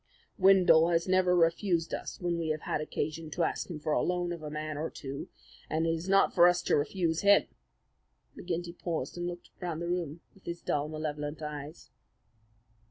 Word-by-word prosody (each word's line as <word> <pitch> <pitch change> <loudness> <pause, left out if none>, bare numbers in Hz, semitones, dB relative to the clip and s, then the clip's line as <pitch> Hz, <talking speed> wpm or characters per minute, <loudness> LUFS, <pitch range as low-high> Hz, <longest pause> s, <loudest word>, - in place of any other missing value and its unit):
"Windle 185 -4 +6
has 170 0 +1
never 185 -1 +3
refused 170 0 +2
us - - -5
when 175 -1 -1
we 165 - -2
have 155 -1 -1
had - - -2
occasion 155 +1 -3
to 170 +3 -1
ask - - -1
for 155 -3 -3
the - - +3
loan 175 -1 -1
of 170 - -8
a 150 - -5
man 155 0 -4
or 155 +2 -3
two, 140 0 -7 0.4
and 160 +1 0
it 165 - +2
is 165 +3 -4
not 195 0 +4
for 175 -1 +7
us 175 0 +2
to - - +2
refuse 165 +2 0
him." 200 0 +6 0.9
McGinty 175 0 -4
paused 165 -7 -3
and 175 0 -3
looked 175 0 -7
round 175 -3 -3
the 170 - -3
room 170 -2 -2
with 195 - -23
his 170 0 -4
dull, 145 0 0
malevolent 155 0 -4
eyes. 150 +1 -7
165 Hz, 190 wpm, -30 LUFS, 155-175 Hz, 0.9 s, for